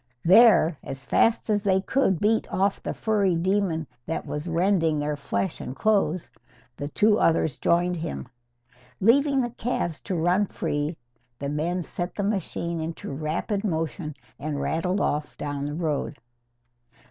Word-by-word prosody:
There, 180 Hz, -, +6 dB
as 135 Hz, 0 st, -7 dB
fast 230 Hz, -, +2 dB
as 210 Hz, -2 st, +2 dB
they 190 Hz, -2 st, +3 dB
could 190 Hz, -, +1 dB
beat 220 Hz, +2 st, +1 dB
off 195 Hz, +1 st, +1 dB
the -, -, -3 dB
furry 200 Hz, -5 st, +1 dB
demon 180 Hz, -2 st, 0 dB, 0.2 s
that 165 Hz, -, -3 dB
was 150 Hz, +3 st, -4 dB
rending 165 Hz, -2 st, +2 dB
their 150 Hz, 0 st, -1 dB
flesh 145 Hz, +5 st, -3 dB
and 130 Hz, -, -6 dB
clothes, 190 Hz, -2 st, +1 dB, 0.4 s
the 145 Hz, -, -4 dB
two 210 Hz, +6 st, +3 dB
others 160 Hz, -3 st, +2 dB
joined 175 Hz, +1 st, +2 dB
him. 160 Hz, -5 st, -5 dB, 0.7 s
Leaving 275 Hz, +6 st, +4 dB
the 240 Hz, -1 st, -2 dB
calves 170 Hz, -, -2 dB
to 185 Hz, -, -2 dB
run 180 Hz, +5 st, +2 dB
free, 150 Hz, 0 st, -2 dB, 0.4 s
the 140 Hz, +3 st, -4 dB
men 170 Hz, +5 st, -1 dB
set 175 Hz, +2 st, -5 dB
the 205 Hz, -, -2 dB
machine 175 Hz, -4 st, -2 dB
into 160 Hz, -1 st, -5 dB
rapid 160 Hz, +8 st, -2 dB
motion 160 Hz, -4 st, -2 dB, 0.2 s
and 145 Hz, 0 st, -3 dB
rattled 180 Hz, +6 st, 0 dB
off 150 Hz, 0 st, -1 dB
down 145 Hz, -1 st, -3 dB
the 145 Hz, +1 st, -3 dB
road. 155 Hz, -3 st, -2 dB
170 Hz, 150 wpm, -25 LUFS, 155-200 Hz, 0.7 s, There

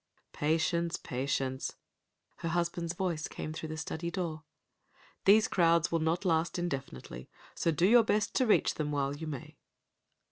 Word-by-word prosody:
"Patience, 165 Hz, +2 st, +1 dB
patience," 130 Hz, 0 st, -2 dB, 0.6 s
her 165 Hz, -, -3 dB
husband's 170 Hz, 0 st, -1 dB
voice 175 Hz, -4 st, -1 dB
came 155 Hz, -, -6 dB
through 160 Hz, 0 st, -6 dB
the 155 Hz, -, -5 dB
study 160 Hz, +1 st, -4 dB
door. 170 Hz, -4 st, -3 dB, 0.8 s
"These 215 Hz, +2 st, +6 dB
crowds 170 Hz, -1 st, +3 dB
will 165 Hz, -, +2 dB
not 165 Hz, +4 st, 0 dB
last 165 Hz, -1 st, +1 dB
indefinitely, 135 Hz, -, -5 dB, 0.2 s
so -, -, 0 dB
do 165 Hz, +2 st, +2 dB
your 235 Hz, +4 st, +7 dB
best 210 Hz, -1 st, +1 dB
to 255 Hz, -, +3 dB
reach 215 Hz, -, +4 dB
them 150 Hz, -1 st, -2 dB
while 140 Hz, -1 st, 0 dB
you 160 Hz, +2 st, -6 dB
may." 140 Hz, -5 st, -7 dB
165 Hz, 150 wpm, -31 LUFS, 150-175 Hz, 0.8 s, your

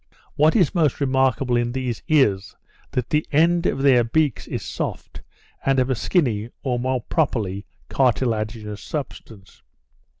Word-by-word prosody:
What 155 Hz, +2 st, +3 dB
is 180 Hz, -10 st, +3 dB
most 155 Hz, -6 st, +1 dB
remarkable 130 Hz, -2 st, +1 dB
in 120 Hz, 0 st, 0 dB
these 130 Hz, -3 st, -3 dB
is, 105 Hz, -11 st, +2 dB, 0.4 s
that 125 Hz, -2 st, -2 dB
the 150 Hz, 0 st, +2 dB
end 170 Hz, +3 st, +3 dB
of 135 Hz, -, -1 dB
their 130 Hz, -4 st, +5 dB
beaks 145 Hz, +2 st, 0 dB
is -, -, -4 dB
soft, -, -, -5 dB, 0.4 s
and 135 Hz, 0 st, +2 dB
of 130 Hz, 0 st, +1 dB
a -, -, +1 dB
skinny, 120 Hz, -, 0 dB
or 125 Hz, -3 st, -1 dB
more 130 Hz, 0 st, -1 dB
properly, 105 Hz, -, -1 dB, 0.2 s
cartilaginous 110 Hz, -4 st, -1 dB
substance. 115 Hz, -9 st, -8 dB
130 Hz, 140 wpm, -22 LUFS, 115-145 Hz, 0.4 s, their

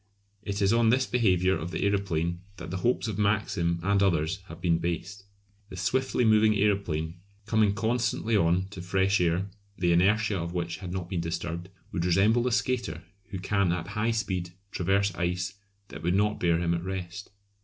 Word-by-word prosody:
It 100 Hz, 0 st, -2 dB
is 100 Hz, +3 st, +4 dB
on 115 Hz, -1 st, +4 dB
this 130 Hz, +3 st, +3 dB
behaviour 95 Hz, -7 st, +2 dB
of 85 Hz, -, -4 dB
the -, -, -3 dB
aeroplane 85 Hz, -4 st, 0 dB, 0.2 s
that -, -, -7 dB
the 95 Hz, -, -2 dB
hopes 120 Hz, +4 st, 0 dB
of 105 Hz, -2 st, -3 dB
Maxim 100 Hz, -5 st, +1 dB
and 100 Hz, +1 st, +2 dB
others 85 Hz, -2 st, +2 dB
have 85 Hz, -1 st, -10 dB
been 85 Hz, -2 st, +2 dB
based. 85 Hz, +4 st, -4 dB, 0.4 s
The 95 Hz, -, -9 dB
swiftly 125 Hz, +7 st, +1 dB
moving 110 Hz, 0 st, +5 dB
aeroplane, 90 Hz, -5 st, 0 dB, 0.3 s
coming 110 Hz, -2 st, +2 dB
constantly 115 Hz, 0 st, 0 dB
on 90 Hz, -1 st, +2 dB
to 95 Hz, -3 st, -8 dB
fresh 95 Hz, +2 st, +1 dB
air, 90 Hz, +3 st, 0 dB, 0.3 s
the 90 Hz, -2 st, +2 dB
inertia 100 Hz, +3 st, +3 dB
of 85 Hz, +1 st, -4 dB
which 85 Hz, -2 st, -2 dB
had 90 Hz, -1 st, -7 dB
not 90 Hz, -2 st, -4 dB
been 90 Hz, -2 st, -2 dB
disturbed, 85 Hz, +1 st, -4 dB, 0.2 s
would 85 Hz, -, -2 dB
resemble 95 Hz, +7 st, +3 dB
the 125 Hz, +1 st, 0 dB
skater 115 Hz, -10 st, -1 dB, 0.3 s
who 100 Hz, -, -5 dB
can 100 Hz, -1 st, +1 dB
at 85 Hz, +1 st, -3 dB
high 105 Hz, +2 st, 0 dB
speed 95 Hz, -6 st, -1 dB, 0.2 s
traverse 100 Hz, +2 st, +1 dB
ice 90 Hz, +2 st, -2 dB, 0.4 s
that 75 Hz, +2 st, -9 dB
would 85 Hz, +3 st, +1 dB
not 105 Hz, +1 st, +1 dB
bear 85 Hz, -2 st, +2 dB
him 85 Hz, 0 st, 0 dB
at 85 Hz, -, -1 dB
rest. 95 Hz, 0 st, -5 dB
95 Hz, 185 wpm, -28 LUFS, 85-105 Hz, 0.4 s, moving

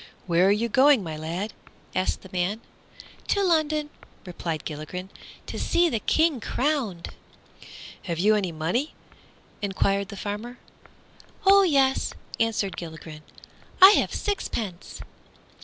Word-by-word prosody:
"Where 175 Hz, +1 st, +3 dB
are -, -, +5 dB
you 215 Hz, +3 st, +1 dB
going, 260 Hz, 0 st, +5 dB
my 160 Hz, -3 st, -5 dB
lad?" 170 Hz, +7 st, -4 dB, 0.4 s
asked 185 Hz, 0 st, -1 dB
the 190 Hz, -, -12 dB
man. 185 Hz, +5 st, -1 dB, 0.7 s
"To 400 Hz, -, +1 dB
London," 310 Hz, -4 st, +1 dB, 0.3 s
replied 170 Hz, -4 st, -5 dB
Gilligren, 170 Hz, +5 st, -6 dB, 0.3 s
"to -, -, -6 dB
see 345 Hz, 0 st, +2 dB
the 230 Hz, -, -1 dB
King 315 Hz, +4 st, +2 dB
crowned." 245 Hz, -, -2 dB, 1.0 s
"Have 170 Hz, -4 st, -3 dB
you 205 Hz, +6 st, +4 dB
any 200 Hz, -4 st, 0 dB
money?" 170 Hz, -, -2 dB, 0.7 s
enquired 200 Hz, 0 st, 0 dB
the 205 Hz, -, -8 dB
farmer. 215 Hz, +5 st, -5 dB, 0.9 s
"Oh 395 Hz, +1 st, +7 dB
yes," 275 Hz, -7 st, +2 dB, 0.2 s
answered 220 Hz, -4 st, 0 dB
Gilligren, 160 Hz, -2 st, -8 dB, 0.6 s
"I 380 Hz, +1 st, +11 dB
have -, -, +2 dB
a -, -, -5 dB
sixpence." 220 Hz, -, -4 dB
205 Hz, 125 wpm, -25 LUFS, 180-280 Hz, 1.0 s, I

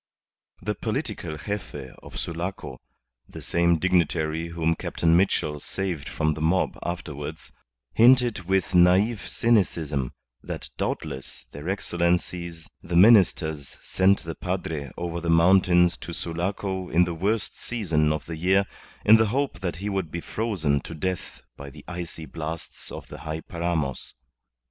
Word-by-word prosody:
The -, -, 0 dB
political 75 Hz, -, -3 dB
Gefe 75 Hz, -10 st, -5 dB
of -, -, -10 dB
Sulaco 85 Hz, -6 st, -4 dB, 0.5 s
(the -, -, -9 dB
same 85 Hz, 0 st, +2 dB
dignitary 80 Hz, -2 st, +1 dB
whom 85 Hz, -1 st, 0 dB
Captain 80 Hz, 0 st, +1 dB
Mitchell 75 Hz, -5 st, +2 dB
saved 90 Hz, -2 st, -3 dB
from 75 Hz, -1 st, 0 dB
the 75 Hz, -, -6 dB
mob 85 Hz, +4 st, +2 dB
afterwards) 80 Hz, -3 st, -5 dB, 0.4 s
hinted 120 Hz, -5 st, +5 dB
with 95 Hz, 0 st, +1 dB
naive 95 Hz, +5 st, +4 dB
cynicism 80 Hz, -, +1 dB, 0.3 s
that -, -, -6 dB
doubtless 65 Hz, -, -4 dB
their 75 Hz, +5 st, -6 dB
Excellencies 85 Hz, -2 st, -1 dB
the 85 Hz, -, -4 dB
Ministers 85 Hz, -, +4 dB
sent 95 Hz, +1 st, +2 dB
the 80 Hz, -, -5 dB
padre 80 Hz, -6 st, -3 dB
over 85 Hz, 0 st, -3 dB
the 85 Hz, -, -2 dB
mountains 90 Hz, +1 st, +5 dB
to 85 Hz, -, -7 dB
Sulaco 95 Hz, +3 st, -3 dB
in 85 Hz, +3 st, +4 dB
the 85 Hz, -1 st, -2 dB
worst 100 Hz, +6 st, -1 dB
season 80 Hz, -10 st, 0 dB
of 75 Hz, -1 st, -2 dB
the 80 Hz, -1 st, -6 dB
year 95 Hz, +4 st, +3 dB, 0.4 s
in 110 Hz, +2 st, +9 dB
the 110 Hz, 0 st, +3 dB
hope 130 Hz, -4 st, -1 dB
that 90 Hz, -1 st, -3 dB
he 95 Hz, +4 st, -5 dB
would 95 Hz, -5 st, -1 dB
be 85 Hz, -, -4 dB
frozen 85 Hz, -9 st, 0 dB
to 80 Hz, -, -8 dB
death 95 Hz, +3 st, -4 dB
by 70 Hz, +1 st, -9 dB
the -, -, -14 dB
icy 85 Hz, -2 st, -6 dB
blasts 80 Hz, +1 st, -6 dB
of -, -, -8 dB
the -, -, -9 dB
high 80 Hz, +1 st, -4 dB
paramos. 85 Hz, -7 st, -3 dB
85 Hz, 145 wpm, -25 LUFS, 80-95 Hz, 0.5 s, in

